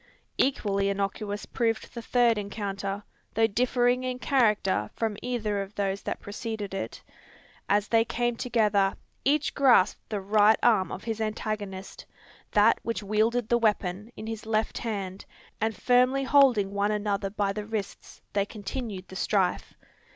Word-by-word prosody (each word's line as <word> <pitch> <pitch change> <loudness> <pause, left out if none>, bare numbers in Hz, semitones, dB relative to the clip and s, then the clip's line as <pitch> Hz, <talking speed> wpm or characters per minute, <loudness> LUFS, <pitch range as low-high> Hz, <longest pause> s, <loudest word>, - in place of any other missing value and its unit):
Equally 200 -7 +1
innocuous 200 +1 -2
proved 225 -2 -1
the 235 - -6
third 235 -1 +3
encounter, 200 -1 -4 0.3
though 225 +1 +4
differing 245 +3 +2
in 255 -1 -2
character 220 -8 +2
from 225 -2 -1
either 215 -5 -1
of 195 +1 -8
those 195 -1 -1
that - - -4
preceded 210 -1 -5
it. 195 - -5 0.7
As 205 0 +2
they 225 -1 +4
came 240 +1 -1
together, 210 -5 +2 0.3
each 290 +1 +2
grasped 245 -8 +3
the 210 -2 -2
right 210 +2 +4
arm 195 -7 +4
of 195 - -6
his 225 -1 -3
antagonist, 210 -3 -4 0.4
that 210 +2 +4
which 230 -2 -3
wielded 215 +3 +1
the 235 +1 +3
weapon, 210 -1 0
in - - -8
his 220 -1 -6
left 220 0 0
hand; 200 -4 -4 0.4
and 220 0 0
firmly 255 +2 +3
holding 260 -8 +4
one 200 +1 0
another 205 -2 -1
by 200 0 -1
the 210 0 -5
wrists, 215 -3 -6
they 200 - +2
continued 205 -2 -6
the 190 - -11
strife. 190 -1 0
215 Hz, 150 wpm, -27 LUFS, 200-235 Hz, 0.7 s, though